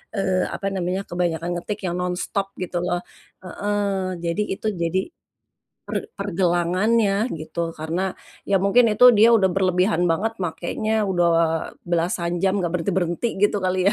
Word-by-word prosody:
eee, 190 -2 +1
apa 195 - -3
namanya 185 +1 -1
kebanyakan 175 -1 -1
ngetik 205 +4 -4
yang 175 - -2
nonstop 180 +2 -2 0.2
gitu 180 0 -4
loh 175 - 0 0.4
heeh, 195 -1 -2
jadi 170 +4 -1
itu 205 +2 -5 0.2
jadi 170 +3 +1 0.9
per - - -2 0.2
pergelangannya 195 +4 +1
gitu 155 +2 -10 0.2
karena 160 +4 -2 0.5
ya 200 - +3
mungkin 240 +5 +5
itu 210 +4 +4
dia 220 +2 +7
udah 190 -3 +3
berlebihan 185 0 +2
banget 205 +7 0
makenya 210 +5 -1
udah 175 -2 +3 0.6
belasan 170 0 -1
jam 195 +1 +2
enggak 175 -4 -1
berhenti-berhenti 180 +3 0
gitu 205 0 +3
kali 185 0 +1
ya. - - +3
185 Hz, 140 wpm, -23 LUFS, 175-200 Hz, 0.9 s, dia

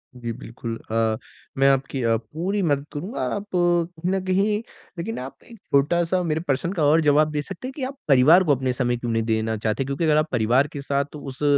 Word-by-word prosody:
जी, 120 -2 -5
बिल्कुल, 115 -1 -7 0.2
अ, 110 -1 +1 0.4
मैं 135 0 +4
आपकी 135 0 0
अ, 115 -1 +3
पूरी 165 - -3
मदद 145 -5 +1
करूँगा 180 - -4
आप 205 - -5
कहीं 175 0 +1
न 190 -1 0
कहीं 195 +3 +2 0.4
लेकिन 220 +7 -4
आप 130 +1 -9
एक 235 - -14
छोटा-सा 170 +5 +1
मेरे 160 -2 0
प्रश्न 165 +1 -1
का 165 -6 0
और 155 +3 +5
जवाब 150 0 +3
दे 150 -1 -1
सकते 195 - -7
हैं 265 - -7
कि 280 - -5
आप 270 +2 -4
परिवार 150 +6 +6
को 150 -5 +3
अपने 130 0 -1
समय 125 -1 0
क्यों 120 0 -3
नहीं 115 0 +1
देना 110 0 0
चाहते? 110 +4 -1
क्योंकि 140 +4 -2
अगर 155 -2 +4
आप 155 +1 +2
परिवार 125 +4 +3
के 145 -1 -7
साथ 140 +1 -2
उस 140 -1 -7
145 Hz, 220 wpm, -23 LUFS, 125-175 Hz, 0.4 s, परिवार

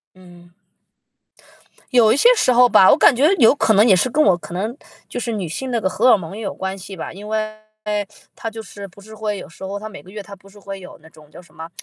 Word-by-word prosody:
嗯。 175 -1 -17 1.4
有 235 -4 +4
一 - - +1
些 470 - +5
时 255 - +2
候 245 0 +5
吧， 190 - +6
我 - - +6
感 290 - +5
觉 280 +6 +3
有 225 - +7
可 225 -6 +1
能 210 +3 +5
也 190 -5 +5
是 255 - +1
跟 305 +6 +2
我 185 - +4
可 175 - -10
能 215 +8 -3 0.3
就 - - -6
是 235 -1 -3
女 195 -6 -4
性 255 +9 -5
那 230 - 0
个 190 - 0
荷 235 +7 +2
尔 230 - +7
蒙 190 +1 -8
也 220 - -7
有 205 - -5
关 190 +1 -5
系 195 +1 -10
吧， - - -7
因 205 +4 -11
为 215 0 -2 0.8
它 225 - -5
就 225 0 -8
是 200 -1 -10
不 195 +1 -18
是 220 +2 -15
会 210 -2 -4
有 - - -10
时 170 - -12
候 195 +1 -5
它 215 +1 -8
每 195 - -11
个 185 - -19
月 210 0 -8
它 200 0 -12
不 195 +1 -20
是 200 - -20
会 195 0 -8
有 180 - -12
那 160 - -16
种 155 -2 -19
叫 - - -13
什 - - -23
么， 160 +1 -9
205 Hz, 295 characters per minute, -19 LUFS, 190-225 Hz, 1.4 s, 有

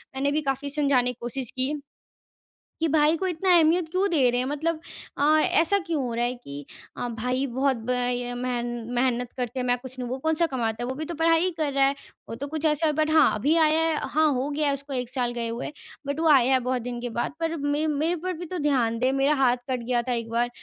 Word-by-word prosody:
मैंने 280 +2 0
भी 305 +2 0
काफ़ी 275 0 -2
समझाने 275 -4 +2
की 245 - -14
कोशिश 245 +1 -5
की, 260 +3 -1 1.1
कि 325 - +2
भाई 305 +1 +3
को 380 - -2
इतना 365 +1 +2
अहमियत 330 +1 +3
क्यों 375 +3 +1
दे 280 -7 +3
रहे 245 +1 0
हैं? 255 - -1
मतलब 310 +3 -1 0.4
अ, - - 0 0.2
ऐसा 335 +6 +3
क्यों 320 -4 -1
हो 245 -2 -3
रहा 235 +1 0
है 245 +1 -1
कि 145 - -9 0.3
अ, 245 - -3
भाई 250 +4 -1
बहुत 265 +1 0
ब 225 +2 -6
अ, 245 0 -1
मेहन 245 -1 -2 0.3
मेहनत 245 -1 0
करते 250 0 -3
हैं 250 - -2
मैं 245 0 +3
कुछ 260 +1 -10
नहीं, 250 -1 -4
वो 255 +2 -3
कौन-सा 320 +4 +1
कमाता 240 -5 -2
है? - - -2
वो 260 - -3
भी 310 +4 -4
तो 340 +2 -5
पढ़ाई 325 +1 +3
ही 370 - +1
कर 300 -3 0
रहा 275 0 +3
है। 275 - +1 0.3
वो - - -5
तो 265 +5 -5
कुछ 315 +1 -5
ऐसा 305 +1 +2
है 305 - +2
बट 310 +1 0
हाँ, 315 -2 +5
अभी 285 +10 +1
आया 315 -1 +4
है 325 -1 +1
हाँ, 310 +1 +3
हो 260 +1 -1
गया 295 +1 0
है 280 - +2
उसको 280 +1 -8
1 250 -2 -2
साल 250 -2 -1
गए 235 -1 -3
हुए 235 +5 -5 0.3
बट 285 +2 -2
वो 325 - +3
आया 265 -3 +5
है - - +5
बहुत 250 0 -1
दिन 240 0 -5
के 245 - -3
बाद। 235 +4 -2
पर 330 0 -1
मे 290 +1 0
मेरे 310 +3 0
पर 370 0 -1
भी 350 0 -7
तो 365 +2 -4
ध्यान 255 -7 +1
दे। 255 +2 +2
मेरा 275 +2 +2
हाथ 260 -3 +3
कट 255 -1 -1
गया 240 0 0
था - - +1
एक 230 -1 -2
बार, 235 +1 +1
270 Hz, 260 wpm, -25 LUFS, 245-310 Hz, 1.1 s, हाँ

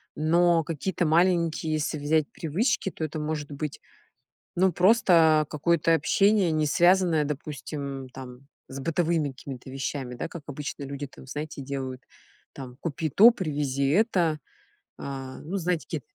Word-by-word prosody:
Но 170 +1 +3
какие-то 170 +3 -2
маленькие 165 -1 +2
если 155 0 -1
взять 155 +1 +2
привычки, 190 - -1
то 160 - -6
это 155 0 -3
может 150 -1 -4
быть, 145 0 -5 0.8
ну, 185 +1 +3
просто 170 -5 +4
какое-то 165 +2 +2
общение, 195 +1 +3
не 155 -1 +1
связанное, 175 0 +3
допустим, 140 -2 -5
там 130 0 -11 0.2
с 135 - -7
бытовыми 165 0 0
какими-то 130 -1 -9
вещами, 130 -1 -4
да. 120 - -5
Как 170 -3 -9
обычно 145 0 -6
люди 140 +1 -5
там, 130 - -15
знаете, 150 +1 -6
делают, 130 -2 -5 0.5
там: 125 -2 -9
"Купи 160 0 -2
то, 220 - +8
привези 145 - -1
это". 175 - +2 0.6
А, 135 -1 -7
ну, 180 +6 -4
знаете, 175 -2 -1
ке 160 - -4
155 Hz, 140 wpm, -26 LUFS, 140-170 Hz, 0.8 s, то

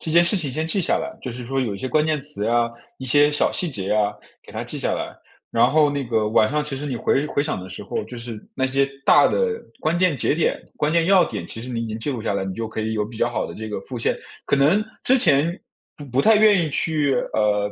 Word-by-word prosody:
这 160 - -5
件 170 +2 +6
事 170 +4 +2
情 155 -7 -2
先 155 +5 -2
记 180 +5 +1
下 175 - +1
来， - - -3
就 130 - -4
是 120 +1 -7
说 135 +3 -1
有 115 -6 -2
一 - - -7
些 115 - -3
关 150 +4 +2
键 155 -1 +1
词 145 -7 -4
啊， 120 0 +2 0.3
一 130 - -8
些 145 +3 +4
小 145 - +1
细 180 - -1
节 100 -8 -5
呀， 105 -1 +2 0.3
给 - - -15
它 - - -4
记 - - -2
下 - - -1
来， - - -5 0.4
然 115 +2 +3
后 150 -1 +4
那 140 -1 -2
个 115 -4 0
晚 110 0 +4
上 150 +3 0
其 145 -2 -4
实 145 - -5
你 130 -4 -2
回 135 +4 +1
回 140 - 0
想 150 - -3
的 95 - -9
时 95 +2 -8
候， - - -3
就 125 - -9
是 115 -2 -7
那 130 - +1
些 135 +1 +1 0.2
大 - - +6
的， 465 -2 0 0.2
关 160 +2 0
键 180 -5 +3
节 - - +1
点， 160 - +1 0.2
关 150 - 0
键 165 +1 +3
要 190 +1 +5
点 - - -5
其 115 - -7
实 120 - -7
你 120 -2 -3
已 - - -3
经 110 0 -5
记 115 +6 -3
录 125 -5 -4
下 - - -1
来， 100 -1 -1
你 95 -1 -4
就 115 +2 -3
可 110 - -5
以 110 +1 -2
有 105 -1 0
比 110 +1 -9
较 120 - +2
好 120 - -2
的 - - -8
这 110 0 -6
个 105 - -3
复 120 +5 -7
现。 - - 0 0.3
可 - - +2
能 155 +10 +4 0.2
之 260 +1 +4
前 165 - +2 0.3
不 145 - -10
不 130 +2 +1
太 220 +5 +6
愿 210 -4 +5
意 155 - -3
去， 150 -1 0 0.2
呃， 105 -1 +1
135 Hz, 310 characters per minute, -22 LUFS, 115-155 Hz, 0.4 s, 件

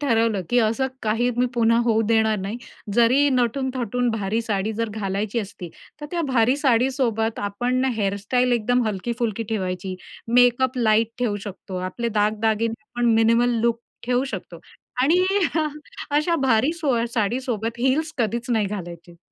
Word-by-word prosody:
ठरवलं 225 -7 +1
की 245 - +4
असं 230 +4 +2 0.2
काही 225 +3 +1
मी 250 +1 +2
पुन्हा 230 -1 +3
होऊ 225 -1 +2
देणार 220 -1 +3
नाही. 195 +4 -4 0.4
जरी 250 +5 +4
नटून-थटून 250 -1 0
भारी 220 0 -1
साडी 215 -1 -1
जर 230 +1 -2
घालायची 205 +1 -2
असती, 195 -4 -6 0.3
तर 295 - -5
त्या 345 -1 -1
भारी 250 +2 +3
साडीसोबत 245 -4 +1
आपण 245 +5 -1
हेअरस्टाईल 210 +5 0
एकदम 245 +2 +2
हलकी-फुलकी 225 +2 -2
ठेवायची. 185 -3 -3 0.4
मेकअप 250 +1 +4
लाईट 220 -1 +3
ठेऊ 230 -4 0
शकतो, 190 -2 -7
आपले 185 +6 -3
दागदागिने 220 +1 +1
आपण 240 -3 0
मिनिमल 230 +1 +3
लूक 235 0 +1 0.3
ठेऊ 250 +1 +1
शकतो. 275 - -7 0.4
आणि 350 +6 +4 0.3
अ, 310 - +2 0.5
अशा 320 +3 +2
भारी 250 +5 +3
सोया 270 -9 0
साडीसोबत 230 0 -1
हील्स 285 +6 +1
कधीच 235 +2 -1
नाही 220 -3 +2
घालायचे. 175 -3 -8
230 Hz, 145 wpm, -23 LUFS, 215-250 Hz, 0.5 s, की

